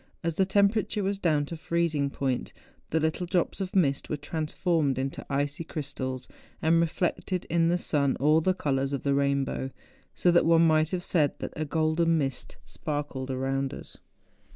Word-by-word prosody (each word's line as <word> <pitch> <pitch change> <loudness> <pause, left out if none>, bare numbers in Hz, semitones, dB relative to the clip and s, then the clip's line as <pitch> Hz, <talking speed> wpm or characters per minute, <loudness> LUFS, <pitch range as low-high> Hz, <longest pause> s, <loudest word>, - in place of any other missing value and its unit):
As 165 -1 -1
the 190 - +3
temperature 205 +1 +2
was 195 +1 -1
down 155 -6 +2
to 165 - -6
freezing 160 -3 0
point, 135 -2 -2 0.4
the 160 - +1
little 160 +3 -1
drops 175 +3 0
of 190 0 -4
mist 140 -7 +2
were 150 - -1
transformed 155 -1 -1
into 135 +1 -3
icy 145 +3 -1
crystals, 130 -5 -5 0.3
and 165 +1 +3
reflected 175 +2 -1
in 165 0 +3
the 175 +1 +2
sun 140 -6 +1
all 155 +4 +3
the 185 +3 +1
colours 135 -4 -1
of 140 - -3
the 140 - +1
rain¬ 140 0 +2
bow; 130 - -4 0.5
so 175 - +3
that 170 -1 +4
one 165 0 +6
might 155 -1 +3
have 180 -1 -2
said 150 -7 +1
that - - -6
a 155 - -2
golden 160 +2 +2
mist 135 -4 -3
sparkled 145 -3 -4
around 135 +1 -1
us. - - -12
155 Hz, 175 wpm, -28 LUFS, 140-170 Hz, 0.5 s, one